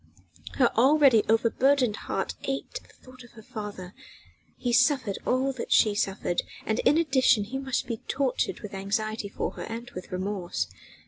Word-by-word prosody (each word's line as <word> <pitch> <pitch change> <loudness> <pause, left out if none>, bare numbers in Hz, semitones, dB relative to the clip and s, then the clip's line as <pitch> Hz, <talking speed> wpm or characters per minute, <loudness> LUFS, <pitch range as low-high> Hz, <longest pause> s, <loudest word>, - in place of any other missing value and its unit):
Her 245 -3 +3
already 265 -1 +5
overburdened 240 +2 +3
heart - - -3
ached 275 - -3
at - - -21
thought 255 0 -16
of 240 - -17
her 220 - -13
father: 205 -4 -7 0.6
he 245 -1 -2
suffered 255 -5 +2
all 265 +2 +1
that 255 - -6
she 215 - +5
suffered, 195 -3 -1 0.2
and 220 +2 0
in 295 - +4
addition 265 -9 +3
he 255 +6 -5
must 265 -2 -2
be 230 - -3
tortured 270 -2 -1
with 210 -1 -8
anxiety 210 +2 -2
for - - -3
her - - -8
and 235 +2 -7
with 185 - -9
remorse. 185 - -2
230 Hz, 160 wpm, -27 LUFS, 210-265 Hz, 0.6 s, already